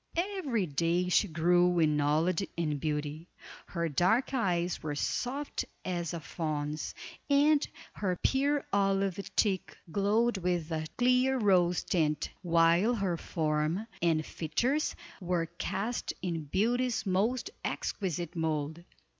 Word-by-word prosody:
Every 335 - 0
day 170 +4 0
she 205 - +4
grew 175 +2 +3
in 155 -2 +3
knowledge 160 +6 +1
and 150 -4 -1
beauty. 150 +2 -3 0.4
Her 170 -1 -2
dark 185 - +2
eyes 180 -8 0
were 150 -1 -3
soft 270 - -2 0.2
as 175 -3 -2
a - - -3
fawn's, 155 -2 -3 0.3
and 290 +1 +4 0.3
her 185 -3 -1
pure 280 +2 +2
olive 195 -1 +2 0.2
cheek 195 -4 +1
glowed 210 +4 +2
with 175 -2 -1
a 155 -1 -2
clear 255 +2 +3
rose 180 -6 +3
tint, 155 -5 0
while 170 +6 +4
her 195 -5 0
form 155 +4 -1 0.2
and 160 -2 +2
features 240 - -1 0.3
were 175 -2 0
cast 200 +7 -3
in 165 -4 -2
beauty's 235 - +1
most 220 - 0
exquisite 175 -3 -3
mold. 160 0 -2
180 Hz, 120 wpm, -31 LUFS, 160-220 Hz, 0.4 s, she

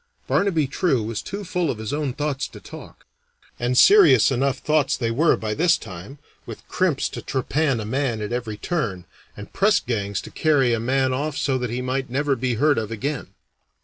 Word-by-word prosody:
Barnaby 175 -7 +1
True 135 - 0
was 110 0 -4
too 200 +1 -6
full 180 -4 -1
of 120 - -2
his 110 +2 -5
own 145 -3 -2
thoughts 145 -2 -2
to - - -13
talk - - -12 0.5
and 125 +1 0
serious 405 - +7
enough 135 +1 0
thoughts 150 -2 +1
they 115 -3 -1
were 155 +8 +3
by 110 -1 -3
this 170 +7 +3
time, 95 +7 -10 0.3
with - - -10
crimps 175 -7 0
to - - -7
trepan 135 0 -1
a 110 - -4
man 125 0 -1
at 105 +2 -4
every 115 -4 -4
turn, 105 - -3 0.3
and 105 - -10
press 205 +1 +3
gangs 100 -4 -3
to - - -11
carry 140 -6 +2
a 115 - 0
man 130 +2 +1
off 145 +3 -2
so 135 - 0
that 125 -1 -3
he 125 +2 -3
might 130 +1 -2
never 140 +2 0
be 125 -1 -1
heard 145 +4 +2
of 110 -2 -4
again. 115 -3 -4
130 Hz, 200 wpm, -23 LUFS, 115-150 Hz, 0.5 s, serious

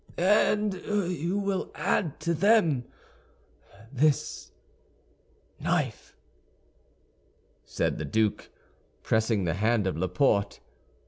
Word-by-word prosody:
"And 210 +2 +3
you 180 -3 -1
will 200 -2 -2
add 165 -1 -1
to 170 - 0
them 165 - +3 1.1
this 145 +2 0 1.1
knife," - - -2 1.5
said - - -2
the 80 - -3
duke, 110 +7 0 0.5
pressing 110 -2 +1
the 85 -2 0
hand 110 +3 +1
of 95 - -1
Laporte. 95 - +1
150 Hz, 85 wpm, -27 LUFS, -, 1.5 s, And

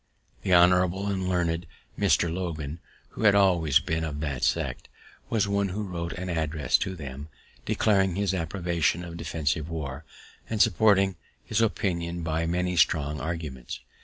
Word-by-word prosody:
The 95 - -2
honorable 90 +2 +4
and 95 -2 -1
learned 85 -2 0 0.3
Mr. 85 -1 +2
Logan, 85 -4 -4 0.3
who - - -9
had 100 -1 +6
always 85 -8 +4
been 80 +1 -2
of 75 -2 -4
that 70 -5 -3
sect, - - -1 0.4
was 110 -3 +1
one 100 0 +1
who 105 +4 -3
wrote 85 -3 -4
an 90 0 -5
address 80 -3 +1
to 95 - -3
them, 70 -1 -8 0.4
declaring 95 -4 +2
his 100 -1 0
approbation 85 -1 -1
of 85 -1 -8
defensive 80 -1 -2
war, 75 -3 -5 0.5
and 110 - -2
supporting 100 -2 +4 0.3
his 110 +1 0
opinion 85 -6 -1
by 80 +1 -1
many 90 +1 0
strong 75 -3 +2
arguments. 75 -6 -5
85 Hz, 150 wpm, -27 LUFS, 80-95 Hz, 0.5 s, had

